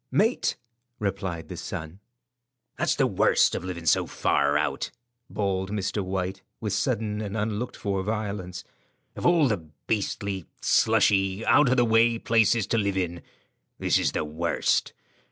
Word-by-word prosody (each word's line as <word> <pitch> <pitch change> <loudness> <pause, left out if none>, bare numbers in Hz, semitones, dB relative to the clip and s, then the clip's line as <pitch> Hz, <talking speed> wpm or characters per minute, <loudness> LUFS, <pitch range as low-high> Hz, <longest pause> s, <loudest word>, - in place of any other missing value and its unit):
"Mate," 225 +5 +1 0.4
replied 95 -5 -3
the - - -7
son. 80 +4 -6 0.8
"That's - - +1
the - - +3
worst - - +3
of - - -3
living 90 -2 -6
so 75 - +3
far 70 0 +1
out," 70 -3 -1 0.4
bawled 95 -2 -1
Mr. 100 0 -2
White, 95 0 -3 0.2
with 105 -3 -2
sudden 110 -1 -1
and 105 0 -4
unlooked 110 +2 -2
for 100 -2 -1
violence; 100 -3 -4 0.5
"of - - 0
all 170 -4 +5
the 90 -9 -3 0.2
beastly, 100 -3 -2
slushy, 100 -2 +3
out 145 -3 +5
of 130 - +2
the 120 - +4
way 115 +1 +4
places 115 -1 +3
to 115 - +3
live 100 -2 0
in, 85 -2 -2 0.6
this - - +2
is - - 0
the - - -1
worst. 80 +3 0
100 Hz, 150 wpm, -26 LUFS, 90-110 Hz, 0.8 s, all